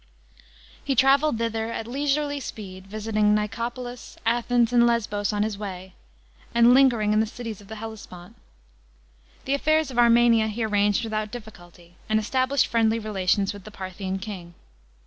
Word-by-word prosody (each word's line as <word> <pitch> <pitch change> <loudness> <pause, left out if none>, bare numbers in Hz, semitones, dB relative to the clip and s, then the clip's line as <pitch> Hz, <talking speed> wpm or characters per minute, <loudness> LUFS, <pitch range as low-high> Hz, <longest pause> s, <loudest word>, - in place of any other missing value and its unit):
He 275 - -1
travelled 275 +1 +4
thither 225 0 -2
at 225 - -4
leisurely 285 +3 -1
speed* 190 -6 -8
visiting 210 0 +1
Nicopolis, 240 +3 -4
Athens, 240 +1 +2
and 240 -1 +5
Lesbos 210 -3 0
on 205 0 0
his 210 -2 -3
way, 190 -2 -7 0.6
and 235 +1 +6
lingering 240 -6 +4
in 215 - +3
the 220 - +1
cities 225 -2 -7
of 200 - -16
the 220 - -8
Hellespont. 210 -5 -10 1.1
The 270 - 0
affairs 310 +1 +1
of 245 - -2
Armenia 235 -1 +5
he 220 +2 -3
arranged 205 0 +1
without 215 -1 -3
difficulty, 175 -6 -12
and 215 0 +3
established 260 +5 +1
friendly 225 -1 +2
relations 200 -2 0
with 200 -2 -11
the 215 - -10
Parthian 190 -1 -5
king. 185 -4 -8
220 Hz, 150 wpm, -25 LUFS, 205-240 Hz, 1.1 s, and